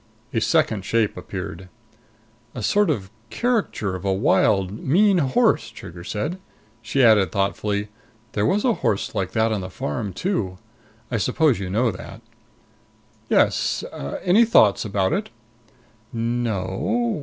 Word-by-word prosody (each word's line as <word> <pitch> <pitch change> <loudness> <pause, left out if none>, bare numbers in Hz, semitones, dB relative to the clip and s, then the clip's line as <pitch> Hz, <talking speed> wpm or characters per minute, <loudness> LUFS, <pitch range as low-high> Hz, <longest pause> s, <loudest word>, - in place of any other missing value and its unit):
A 115 - +1
second 115 - +1
shape 110 +1 +1
appeared. 90 +4 -7 0.9
"A 125 - -5
sort 205 - +3
of 100 -10 -2 0.2
caricature 225 - -1
of 90 - -7
a 100 - +1
wild, 95 0 +2
mean 190 +6 +4
horse," 130 -4 +2
Trigger 85 0 -10
said. 145 - -3 0.4
She 130 +4 +1
added 110 -5 +5
thoughtfully, 100 +1 -1 0.4
"there 105 +1 0
was 205 - +1
a 245 - +4
horse 100 - 0
like 90 -2 -2
that 110 0 +2
on 105 -3 -1
that 90 0 -7
farm, 95 +7 -3
too. 95 - -2 0.5
I 115 - +1
suppose 130 +4 +2
you 95 -2 -4
know 115 +5 +1
that?" 90 - -10 1.1
"Yes. - - +2 0.4
Any 190 +6 +5
thoughts 110 - +4
about 100 -3 0
it?" 205 - -2 0.8
"No 115 -3 -1
o 95 +1 -4
o. 235 -4 0
110 Hz, 145 wpm, -23 LUFS, 95-155 Hz, 1.1 s, added